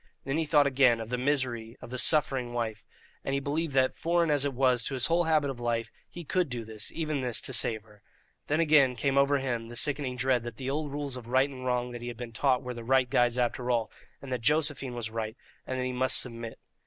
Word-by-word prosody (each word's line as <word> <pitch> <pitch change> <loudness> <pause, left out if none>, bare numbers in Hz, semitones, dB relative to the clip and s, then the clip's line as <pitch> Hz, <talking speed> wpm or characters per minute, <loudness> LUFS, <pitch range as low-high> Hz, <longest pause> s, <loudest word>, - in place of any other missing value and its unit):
Then 135 +4 -1
he 160 - 0
thought 150 -1 +4
again 130 -4 +3
of 115 0 -6
the 125 - -1
misery 125 -4 -1
of - - -11
the 125 - -3
suffering 130 -5 +3
wife, 115 -3 -4 0.4
and 135 - -1
he - - +1
believed 145 +1 -2
that, 130 -1 +3
foreign 170 -1 +1
as 145 -2 +2
it 140 -1 -1
was 125 -2 +2
to 135 - -1
his 125 -1 +3
whole 170 +1 +2
habit 155 -3 +2
of 125 - -9
life, 115 -1 -2 0.2
he 175 - -9
could 180 +1 0
do 120 -2 -5
this, 110 -1 -4
even 155 -4 -2
this, 125 -3 0
to 130 - -4
save 110 -1 +2
her. 105 -2 -21 0.5
Then 150 +2 +1
again 150 -6 +4
came 135 +3 0
over 140 +1 +4
him 120 -4 -3
the 120 - -9
sickening 140 -1 0
dread 130 -1 +1
that 120 -1 -8
the 135 0 -3
old 150 0 -3
rules 140 -2 -2
of 120 -2 -10
right 130 +3 +3
and 130 -1 -7
wrong 125 0 -1
that 120 -1 -7
he 120 - -6
had 120 -2 -6
been 120 -1 -7
taught 130 +2 +1
were 125 0 -5
the 120 -1 -8
right 130 +1 +2
guides 120 0 +2
after 125 0 -1
all, 120 -2 0 0.3
and 135 - -8
that 125 -2 -2
Josephine 145 -2 +1
was 115 -2 -4
right, 110 +1 -4 0.3
and 130 - -3
that 130 - -1
he 130 - -3
must 130 +1 +3
submit. 115 -2 -3
130 Hz, 255 wpm, -28 LUFS, 120-140 Hz, 0.5 s, thought